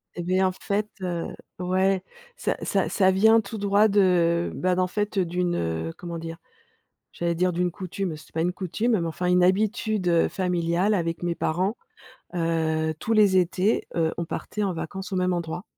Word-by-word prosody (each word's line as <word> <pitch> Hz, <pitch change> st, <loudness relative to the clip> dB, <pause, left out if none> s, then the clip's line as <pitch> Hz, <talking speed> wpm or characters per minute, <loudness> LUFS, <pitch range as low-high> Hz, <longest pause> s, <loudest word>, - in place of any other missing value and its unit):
Et 175 Hz, -, -4 dB
bien, 185 Hz, +2 st, +2 dB
en -, -, 0 dB
fait, 205 Hz, +3 st, -2 dB
heu, 175 Hz, -2 st, -2 dB, 0.3 s
ouais, 185 Hz, +1 st, +1 dB, 0.3 s
ça -, -, -2 dB
ça -, -, 0 dB
ça 190 Hz, -3 st, +3 dB
vient 220 Hz, +4 st, +5 dB
tout 220 Hz, +1 st, -5 dB
droit 205 Hz, +1 st, +4 dB
de, 180 Hz, -4 st, +3 dB
bah, 185 Hz, 0 st, +1 dB
d'en 185 Hz, 0 st, +1 dB
fait, 210 Hz, +2 st, -2 dB
d'une, 175 Hz, 0 st, 0 dB
heu, 80 Hz, -, -2 dB
comment 170 Hz, -1 st, -6 dB
dire? 165 Hz, 0 st, -6 dB, 0.8 s
J'allais 170 Hz, 0 st, -1 dB
dire, 180 Hz, +2 st, +1 dB
d'une 180 Hz, +1 st, 0 dB
coutume, 185 Hz, -1 st, -4 dB
c'est 150 Hz, -, -16 dB
pas 160 Hz, -, 0 dB
une 175 Hz, +2 st, +1 dB
coutume, 200 Hz, +6 st, -1 dB
mais, 170 Hz, -, -1 dB
enfin, 165 Hz, +2 st, -3 dB
une 180 Hz, 0 st, +4 dB
habitude, 210 Hz, +1 st, +1 dB
heu, 170 Hz, -1 st, +3 dB
familiale, 180 Hz, +1 st, 0 dB
avec 170 Hz, -4 st, -1 dB
mes 175 Hz, -1 st, 0 dB
parents, 185 Hz, +8 st, -1 dB, 0.6 s
heu, 160 Hz, -2 st, 0 dB
tous 225 Hz, -, -3 dB
les 210 Hz, -3 st, +5 dB
étés, 185 Hz, +3 st, +1 dB
heu, 160 Hz, -1 st, +1 dB
on 170 Hz, -, -1 dB
partait 210 Hz, +5 st, -4 dB
en 195 Hz, -, 0 dB
vacances 190 Hz, +3 st, -6 dB
au 190 Hz, -, -1 dB
même 185 Hz, 0 st, +1 dB
endroit. 170 Hz, +1 st, -3 dB
180 Hz, 185 wpm, -25 LUFS, 170-195 Hz, 0.8 s, vient